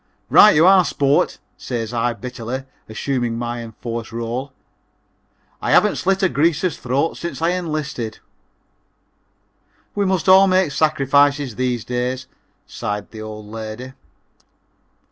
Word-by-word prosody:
"Right 210 - +8
you 160 +3 +5
are, 190 0 +7
sport," 140 -3 +1 0.2
says 120 -2 -4
I 120 0 0
bitterly, 125 +1 -6 0.3
assuming 120 0 -2
my 120 0 -4
enforced 115 0 -6
role, 120 +4 -4 1.1
"I - - -2
haven't - - +4
slit 195 +1 0
a - - +6
Greaser's 165 +2 +1
throat 135 +6 -1
since 170 - -5
I 165 +1 +1
enlisted." 150 -10 -3 1.8
"We 200 -1 0
must 190 -2 0
all 190 +1 +7
make 185 -4 +2
sacrifices 140 -3 +2
these 125 -1 -1
days," 125 +1 -2 0.4
sighed 105 0 -5
the 110 - -9
old 110 -1 -8
lady. 110 +4 -7
130 Hz, 125 wpm, -20 LUFS, 115-160 Hz, 1.8 s, Right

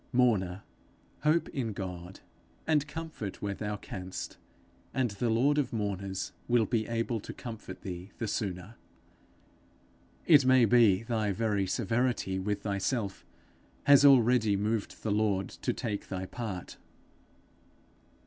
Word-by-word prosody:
Mourner, 105 -7 +2 0.6
hope 155 +3 +2
in 120 -6 -3
God, 90 -2 -7 0.4
and 150 -2 +2
comfort 155 - -6
where 100 -1 -2
thou 105 +1 -4
canst, 95 -2 -7 0.6
and 130 -4 +1
the 110 +4 -1
lord 135 +7 +3
of 135 -4 -1
mourners 100 -3 -3 0.2
will 120 -2 +3
be 110 -1 0
able 115 0 -1
to - - -8
comfort 115 -3 -8
thee 90 0 -6
the 115 - -3
sooner. 100 +1 -4 1.5
It 150 -5 +7
may 130 -1 +6
be 110 -3 +5
thy 110 -3 0
very 100 -2 0
severity 115 -3 0
with 105 +1 -2
thyself, 100 0 -2 0.6
has 140 0 +7
already 125 -6 +5
moved 105 +1 -2
the 110 - 0
Lord 100 -2 +1
to - - -3
take 105 -3 -4
thy 95 -1 -4
part. 100 -4 -6
110 Hz, 130 wpm, -30 LUFS, 100-120 Hz, 1.5 s, It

